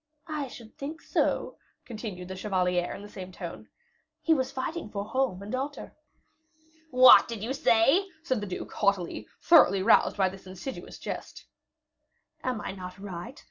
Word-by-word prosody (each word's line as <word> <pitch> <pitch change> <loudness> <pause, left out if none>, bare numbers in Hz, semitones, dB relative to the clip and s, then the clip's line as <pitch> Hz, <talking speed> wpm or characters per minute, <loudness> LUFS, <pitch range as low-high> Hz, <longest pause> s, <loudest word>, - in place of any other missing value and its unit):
"I 305 -4 -3
should 230 -3 -13
think 300 +3 -5
so," - - 0 0.3
continued 210 -6 -7
the 190 - -5
chevalier, 180 -3 0
in 200 - -9
the - - -9
same 185 -2 -9
tone. - - -8 0.5
"He 325 - +4
was 265 -3 0
fighting 310 0 -4
for 200 -1 -4
home 225 -4 -1
and 210 - -7
altar." 275 +3 -4 0.9
"What 255 -1 +8
did 225 -3 -6
you 245 +4 -2
say?" 275 - +4 0.2
said 260 -9 0
the 205 - -4
duke, 185 - -6
haughtily, 200 -4 0 0.2
thoroughly 195 - +6
roused 220 - +4
by 190 -2 +3
this 190 0 -12
insidious 190 +8 -7
jest. - - -7 1.0
"Am 250 -4 -2
I - - -4
not 185 -1 -8
right? 200 +5 -8
215 Hz, 160 wpm, -28 LUFS, 190-265 Hz, 1.0 s, What